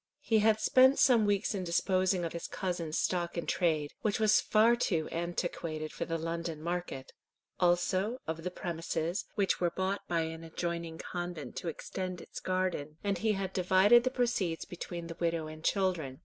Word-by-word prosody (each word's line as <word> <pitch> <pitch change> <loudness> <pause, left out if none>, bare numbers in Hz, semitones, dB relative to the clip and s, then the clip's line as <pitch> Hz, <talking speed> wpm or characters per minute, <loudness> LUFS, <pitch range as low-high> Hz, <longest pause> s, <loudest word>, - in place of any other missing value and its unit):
He 220 -1 +3
had 215 0 +4
spent 260 +5 +5
some 230 -5 +5
weeks 205 +1 +1
in 195 -2 -2
disposing 185 +1 +1
of 165 - -4
his 170 - -5
cousin's 175 -5 -3
stock 175 -1 -1
in 170 - -2
trade, 155 -5 0
which 215 0 0
was 215 -1 +5
far 225 +2 +4
too 170 -9 0
antiquated 165 -2 -3
for - - -3
the 165 - -2
London 165 -1 -3
market; 170 -5 -4 0.5
also 185 +5 +2
of 160 +1 -4
the 180 - -1
premises, 170 0 -3
which 195 -2 +1
were 175 - +3
bought 190 +3 -2
by 170 -1 +1
an 160 0 -5
adjoining 170 0 -4
convent 175 -3 -5
to - - -4
extend 185 +2 -4
its - - -9
garden; 185 -5 -2
and 200 -3 0
he 220 +1 +2
had 190 -1 -3
divided 190 +6 +5
the 255 - +2
proceeds 235 -10 -1
between 175 -1 -6
the 165 0 -8
widow 165 -2 0
and 155 0 -9
children. 175 -10 0
175 Hz, 175 wpm, -31 LUFS, 165-195 Hz, 0.5 s, spent